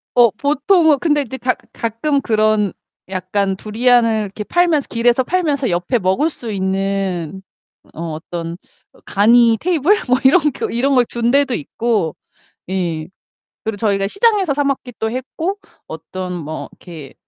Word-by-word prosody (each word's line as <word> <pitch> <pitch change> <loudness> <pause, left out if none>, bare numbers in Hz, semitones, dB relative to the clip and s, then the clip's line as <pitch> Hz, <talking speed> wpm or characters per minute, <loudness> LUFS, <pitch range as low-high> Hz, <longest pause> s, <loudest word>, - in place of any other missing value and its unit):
어 240 -1 +6
보통은 295 - +2
근데 295 -2 +2
이제 265 -1 -5
가 255 0 +1 0.2
가끔 235 +6 -1
그런 215 -3 +2 0.4
약간 190 +1 -1
두리안을 230 +2 +2
이렇게 205 +2 -6
팔면서 335 +1 +1
길에서 240 +2 +2
팔면서 295 -5 0
옆에 175 +8 0
먹을 190 - +1
수 240 -7 -6
있는 190 -2 -2 0.5
어 165 0 -5
어떤 165 +1 -6 0.4
어 - - -21
간이 230 +2 +4
테이블 340 0 +2 0.2
뭐 250 - +4
이런 290 +8 +6
거 - - -4
이런 270 +4 +1
걸 250 -2 +5
둔 235 0 -1
데도 275 -1 +2
있고 205 -1 -1 0.5
예. 170 -4 -2 0.6
그리고 220 -1 -2
저희가 200 -2 +1
시장에서 400 - +2
사 290 - 0
먹기도 250 -5 -3
했고 315 - -3 0.3
어떤 180 +3 -6
뭐 155 -2 -6
이렇게 155 -7 -12
230 Hz, 285 characters per minute, -18 LUFS, 190-275 Hz, 0.6 s, 어